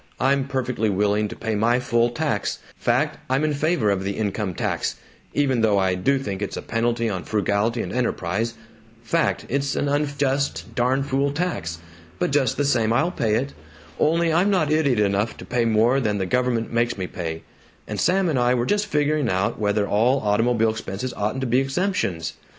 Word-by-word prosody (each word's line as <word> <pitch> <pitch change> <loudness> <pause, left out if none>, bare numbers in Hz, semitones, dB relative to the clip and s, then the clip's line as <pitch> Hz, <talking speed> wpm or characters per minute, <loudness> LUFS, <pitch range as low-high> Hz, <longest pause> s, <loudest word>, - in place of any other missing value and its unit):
I'm 135 +1 +2
perfectly 125 -5 -1
willing 105 +2 +1
to - - -8
pay 110 - -3
my 115 +3 +2
full 120 -1 +2
tax 120 - -1 0.2
fact, - - 0
I'm 130 +3 +1
in 155 -1 +1
favor 145 -7 +1
of 95 -1 -1
the 100 0 -3
income 105 -3 -2
tax - - -1 0.4
even 135 -5 +2
though 105 -2 +3
I 95 -1 +2
do 95 +10 +1
think 100 -7 -4
it's 100 - -3
a - - -5
penalty 115 0 0
on 95 -5 -3
frugality 105 +4 0
and - - -6
enterprise 115 -2 -1 0.5
fact, 165 +6 0
it's 140 0 -1
an 145 - 0
unjust, 140 -1 -1
darn 130 +3 +1
fool 140 +1 0
tax. 145 - -2 0.4
But - - 0
just 135 -4 +1
the 145 - +1
same, 115 -5 +2
I'll 155 +9 +2
pay 110 -10 0
it. 135 +5 -1 0.5
Only, 165 +1 +2
I'm 180 +5 +3
not 180 -7 +2
idiot 145 -7 +2
enough 105 +2 +1
to - - -9
pay 120 -1 0
more 115 +4 +3
than 105 -5 0
the 95 - -1
government 120 +1 0
makes 120 -1 +1
me 95 - -2
pay, 80 -3 -5 0.4
and - - -4
Sam 190 +1 +2
and 150 -6 +1
I 125 +1 +3
were 120 -1 0
just 205 +7 +1
figuring 150 - +1
out 95 +2 0
whether 105 -1 +1
all 120 +6 +3
automobile 115 +2 +2
expenses 110 +3 -5
oughn't 105 +6 -2
to - - -1
be 125 +1 +3
exemptions. 135 - -1
120 Hz, 190 wpm, -23 LUFS, 105-140 Hz, 0.5 s, though